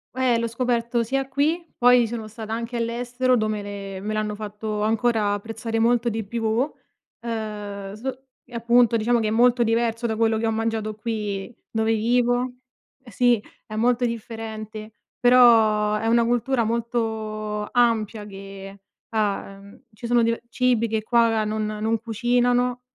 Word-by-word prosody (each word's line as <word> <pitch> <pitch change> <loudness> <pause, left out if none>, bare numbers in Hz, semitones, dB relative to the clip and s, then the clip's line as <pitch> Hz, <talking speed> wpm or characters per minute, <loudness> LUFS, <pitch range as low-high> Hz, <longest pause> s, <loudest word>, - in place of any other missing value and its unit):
Ehm, 250 -3 +2
l'ho 230 - -1
scoperto 235 0 0
sia 270 +3 -1
qui, 300 +6 0
poi 245 -1 +5
sono 225 -1 -5
stata 220 0 -8
anche 235 +1 -3
all'estero 245 +2 0
dove 215 -1 -1
le 200 -1 -7
me 215 +1 -3
l'hanno 215 0 -1
fatto 210 0 -5
ancora 220 -1 +1
apprezzare 225 +2 -4
molto 235 +1 +2
di 220 0 -3
più, 230 +5 -1 0.5
ehm, 210 -4 -5
so 260 +4 -6 0.2
e 245 - -13
appunto 235 0 +4
diciamo 235 +2 +2
che 220 - 0
è - - +1
molto 240 +2 +4
diverso 230 +1 +1
da 220 - -1
quello 225 0 +2
che 225 - 0
ho - - +1
mangiato 220 -1 -2
qui 210 -1 -4
dove 220 0 +1
vivo. 245 +2 +1 0.5
Sì 240 0 +2 0.3
è 215 - -7
molto 245 +2 +2
differente, 220 -2 -6 0.3
però 225 -4 +5
è 225 +1 -2
una 235 0 +4
cultura 240 +1 +1
molto 220 -2 -2
ampia 225 -3 +1
che, 195 0 -10 0.3
uhm, 200 0 -3
ci 235 +3 -7
sono 240 -1 +3
dive 230 +1 0
cibi 240 -1 +1
che 220 -1 -2
qua 230 -1 +3
non 215 0 -2
non 215 +1 -1
cucinano, 245 +2 +1
225 Hz, 150 wpm, -23 LUFS, 215-240 Hz, 0.5 s, poi